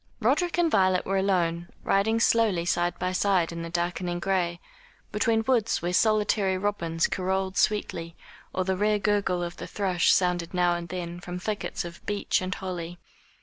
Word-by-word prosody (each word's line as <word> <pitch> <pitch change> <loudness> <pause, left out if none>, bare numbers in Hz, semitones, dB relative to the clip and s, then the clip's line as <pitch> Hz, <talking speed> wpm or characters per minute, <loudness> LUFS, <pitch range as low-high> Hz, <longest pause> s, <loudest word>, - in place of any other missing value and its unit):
Roderick 350 -2 +1
and 340 -2 +2
Violet 185 -3 +3
were 195 0 +1
alone, 175 -3 0 0.2
riding 220 +3 +2
slowly 220 -7 +3
side 175 0 0
by 185 - -1
side 185 -2 +2
in 170 0 -5
the 165 - -5
darkening 175 +1 -2
gray, 175 -2 0 0.5
between 225 +1 +1
woods 230 -8 +1
where 175 +1 -1
solitary 210 -2 +2
robins 170 -5 -1
carolled 190 0 -1
sweetly, 170 -5 0 0.4
or 185 - -1
the 190 0 0
rare 210 +2 +2
gurgle 200 -3 0
of 175 0 -5
the - - -7
thrush 185 -4 +1
sounded 180 -1 +1
now 175 -1 +3
and 170 -1 -5
then 175 -1 -5
from 180 0 -6
thickets 205 0 -3
of 170 0 -10
beech 205 -2 0
and 185 +1 -3
holly. 175 -2 -5
185 Hz, 170 wpm, -27 LUFS, 175-205 Hz, 0.5 s, Violet